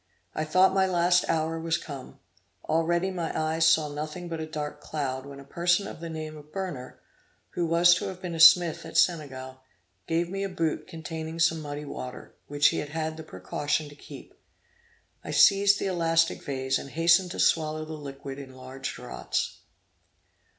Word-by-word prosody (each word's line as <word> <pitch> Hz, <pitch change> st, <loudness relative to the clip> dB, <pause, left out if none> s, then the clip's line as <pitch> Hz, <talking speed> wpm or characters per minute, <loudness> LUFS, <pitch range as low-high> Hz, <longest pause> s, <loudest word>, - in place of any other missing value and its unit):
I 155 Hz, -, -2 dB
thought 185 Hz, +4 st, +4 dB
my 190 Hz, -1 st, +3 dB
last 175 Hz, 0 st, +3 dB
hour 165 Hz, 0 st, 0 dB
was 165 Hz, 0 st, 0 dB
come. 140 Hz, -6 st, -9 dB, 0.5 s
Already 170 Hz, +4 st, +1 dB
my 175 Hz, -3 st, -3 dB
eyes 160 Hz, +1 st, +2 dB
saw 160 Hz, -2 st, +4 dB
nothing 155 Hz, +4 st, -6 dB
but 165 Hz, -1 st, -4 dB
a 160 Hz, -, -4 dB
dark 150 Hz, -1 st, -5 dB
cloud, 135 Hz, -3 st, -4 dB
when 140 Hz, 0 st, -10 dB
a -, -, -10 dB
person 175 Hz, +6 st, +1 dB
of -, -, -8 dB
the 165 Hz, 0 st, -6 dB
name 155 Hz, -1 st, -6 dB
of 150 Hz, 0 st, -13 dB
Berner, 165 Hz, -10 st, -6 dB, 0.5 s
who 170 Hz, -1 st, -1 dB
was 170 Hz, +1 st, +6 dB
to 180 Hz, -, -1 dB
have 185 Hz, -1 st, -7 dB
been 180 Hz, -2 st, -5 dB
a 165 Hz, -, -5 dB
smith 170 Hz, 0 st, +7 dB
at -, -, -5 dB
Senegal, 130 Hz, -6 st, 0 dB, 0.5 s
gave 165 Hz, +1 st, +1 dB
me 195 Hz, +2 st, -4 dB
a 195 Hz, -, -2 dB
boot 165 Hz, -4 st, -2 dB
containing 160 Hz, 0 st, -6 dB
some 165 Hz, -1 st, +2 dB
muddy 145 Hz, 0 st, -6 dB
water, 125 Hz, -3 st, -8 dB
which 145 Hz, 0 st, +4 dB
he -, -, -2 dB
had 145 Hz, -, -5 dB
had 160 Hz, +1 st, -3 dB
the 160 Hz, -, -8 dB
precaution 145 Hz, +6 st, -3 dB
to 145 Hz, -, -14 dB
keep. -, -, -12 dB, 0.9 s
I -, -, -8 dB
seized 200 Hz, -1 st, +5 dB
the -, -, -3 dB
elastic 165 Hz, -3 st, +1 dB
vase, 130 Hz, -2 st, -1 dB
and 140 Hz, -, -8 dB
hastened 170 Hz, +4 st, +3 dB
to -, -, -6 dB
swallow 155 Hz, -1 st, +2 dB
the 160 Hz, -, -7 dB
liquid 140 Hz, -2 st, -8 dB
in 130 Hz, -2 st, -10 dB
large 130 Hz, +1 st, -6 dB
draughts. -, -, -4 dB
160 Hz, 185 wpm, -27 LUFS, 145-170 Hz, 0.9 s, smith